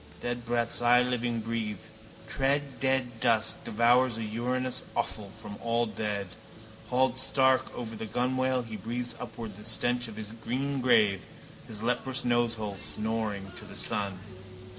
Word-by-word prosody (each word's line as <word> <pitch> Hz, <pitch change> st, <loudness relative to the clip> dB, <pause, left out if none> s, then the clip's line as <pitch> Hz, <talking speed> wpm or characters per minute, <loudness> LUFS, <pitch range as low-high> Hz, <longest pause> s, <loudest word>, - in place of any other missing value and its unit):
Dead 120 Hz, -1 st, -4 dB
breaths 120 Hz, 0 st, +1 dB
I 120 Hz, +1 st, +6 dB
living 120 Hz, -2 st, -1 dB
breathe, 110 Hz, -2 st, -2 dB, 0.5 s
tread 140 Hz, +1 st, 0 dB
dead 130 Hz, -3 st, 0 dB
dust, 110 Hz, -2 st, +2 dB
devour 120 Hz, +4 st, +4 dB
a 115 Hz, -2 st, -4 dB
urinous 125 Hz, +4 st, -1 dB
offal 110 Hz, -3 st, -1 dB
from 105 Hz, 0 st, -9 dB
all 115 Hz, 0 st, +1 dB
dead. 105 Hz, -2 st, -2 dB, 0.6 s
Hauled 130 Hz, 0 st, +2 dB
stark 130 Hz, -1 st, +3 dB
over 115 Hz, -2 st, -4 dB
the 110 Hz, -, -5 dB
gunwale 130 Hz, +2 st, +1 dB
he 110 Hz, -2 st, -6 dB
breathes 120 Hz, +2 st, -3 dB
upward 115 Hz, -4 st, -7 dB
the 105 Hz, -, -10 dB
stench 120 Hz, +2 st, +1 dB
of 110 Hz, -, -8 dB
his 110 Hz, -1 st, -5 dB
green 130 Hz, +5 st, -2 dB
grave, 105 Hz, -6 st, +4 dB, 0.4 s
his 110 Hz, -1 st, -5 dB
leprous 125 Hz, +2 st, +1 dB
nosehole 115 Hz, -4 st, +1 dB
snoring 105 Hz, +5 st, 0 dB
to -, -, -4 dB
the -, -, -10 dB
sun. 100 Hz, -2 st, +1 dB
120 Hz, 145 wpm, -29 LUFS, 110-125 Hz, 0.6 s, I